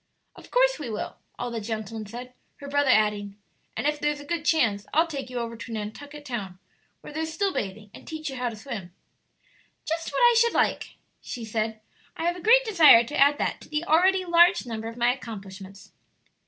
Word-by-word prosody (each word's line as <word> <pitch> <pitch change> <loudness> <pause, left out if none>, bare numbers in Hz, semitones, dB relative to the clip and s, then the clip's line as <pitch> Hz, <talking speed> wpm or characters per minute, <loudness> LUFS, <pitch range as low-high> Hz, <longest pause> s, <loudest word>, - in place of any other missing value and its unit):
"Of - - -14
course - - +3
we 280 -6 -5
will!" 215 - -5 0.2
all 245 0 -4
the 230 -1 -4
gentlemen 220 0 -5
said, 245 +4 -9 0.2
her 285 - -10
brother 285 -1 +1
adding, 210 -3 +2 0.4
"And - - -2
if 295 0 +1
there's 295 0 -1
a 290 - -10
good 335 0 -3
chance, 225 -12 +2
I'll 325 +2 +5
take 275 -6 -6
you 250 - -6
over 230 -1 -3
to 230 +1 -9
Nantucket 285 +8 -7
Town, 200 -7 -5 0.4
where - - -10
there's 320 +1 -3
still 390 +4 -1
bathing, 205 +1 -5
and - - -13
teach 315 -1 -6
you 270 - -4
to 245 -2 -3
swim." 210 -6 -8 0.9
"Just 325 +1 -3
what - - -4
I 480 -1 +6
should 470 0 +3
like," - - 0 0.3
she 235 -2 -6
said. 220 0 -3 0.4
"I - - -4
have 345 +1 +1
a 360 - -9
great - - +5
desire 325 - +7
to 295 +6 -7
add 285 +1 +5
that - - -2
to - - -14
the 300 +1 -1
already 370 +3 +3
large 345 -3 +5
number 225 -2 -5
of 230 +1 -8
my 240 +1 +3
accomplishments." 195 -5 -10
250 Hz, 205 wpm, -26 LUFS, 220-315 Hz, 0.9 s, desire